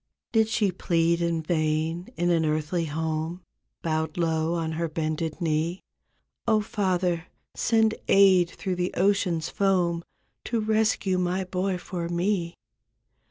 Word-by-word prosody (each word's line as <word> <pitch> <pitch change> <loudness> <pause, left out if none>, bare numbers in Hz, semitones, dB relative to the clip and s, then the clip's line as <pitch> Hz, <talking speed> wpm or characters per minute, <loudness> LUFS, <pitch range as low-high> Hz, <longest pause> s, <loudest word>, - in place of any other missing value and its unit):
Did 220 -1 +3
she 215 -3 +1
plead 170 -1 +1
in 170 -1 0
vain 160 +1 -1
in 175 +1 +2
an 165 -1 +3
earthly 155 +2 0
home 160 +3 -3 0.4
Bowed 160 -1 -1
low 165 -1 +1
on 165 -1 -2
her 165 +1 -2
bended 155 +1 -2
knee, 165 +2 -1 0.6
''0, 215 -1 +3
Father, 185 -5 0 0.3
send 225 -1 +3
aid 190 -3 +6
through 185 0 -4
the 180 +1 -2
ocean's 185 -4 +1
foam 180 -4 +1 0.4
To 235 - 0
rescue 215 -3 +1
my 180 +1 0
boy 185 +1 -1
for 175 -1 -5
me?" 175 0 0
175 Hz, 130 wpm, -26 LUFS, 160-190 Hz, 0.6 s, aid